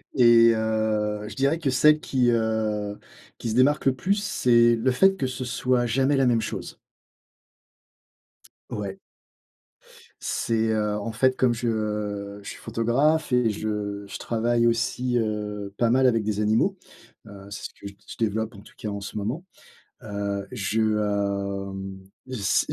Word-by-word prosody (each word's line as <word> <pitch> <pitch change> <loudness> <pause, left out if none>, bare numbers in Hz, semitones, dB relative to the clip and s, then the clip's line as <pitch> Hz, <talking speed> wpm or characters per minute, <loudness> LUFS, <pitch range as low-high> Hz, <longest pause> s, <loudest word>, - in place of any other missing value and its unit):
Et 115 -2 +7
heu, 110 -1 -1
je 105 - -9
dirais 140 +5 +1
que 145 - 0
celles 150 +4 +5
qui, 125 -4 +1
heu, 110 -2 -1 0.4
qui 115 - -4
se 110 - -2
démarquent 140 +4 +3
le 130 - +3
plus, 190 +11 +1
c'est 120 - +3
le 120 +3 +1
fait 190 +9 +4
que 140 -9 -2
ce 130 0 -5
soit, 125 +1 +1
jamais 135 +5 +2
la 135 - +3
même 120 -2 +3
chose. - - -6 1.9
Ouais. 100 -2 -5 1.2
C'est, 115 -1 0
heu, 105 -1 0
en 110 +2 -4
fait, 130 +3 +2
comme 125 -2 +3
je 105 -3 -3
je - - -9
suis - - -7
photographe 135 +7 +1
et 125 -3 +3
je 105 -1 -3
je - - -7
travaille 120 +1 +1
aussi, 120 +2 +1
heu, 105 -2 -3
pas 115 +1 +2
mal 130 +2 +4
avec 115 -3 +2
des 105 0 -1
animaux. 110 - +2 0.5
Heu, 100 -1 -12
c'est 100 - -7
ce - - -3
que - - -12
je 100 - -7
d 100 - -27
je - - -8
développe 110 0 -1
en 100 - -11
tout - - -17
cas 105 - -5
en 100 0 -4
ce 105 +1 -6
moment. 120 - -3 0.6
Heu, 100 -2 -4
je, 110 -2 -1
hem, 100 -2 -1 0.3
s 115 -6 +1
je - - -5
110 Hz, 165 wpm, -25 LUFS, 105-125 Hz, 1.9 s, Et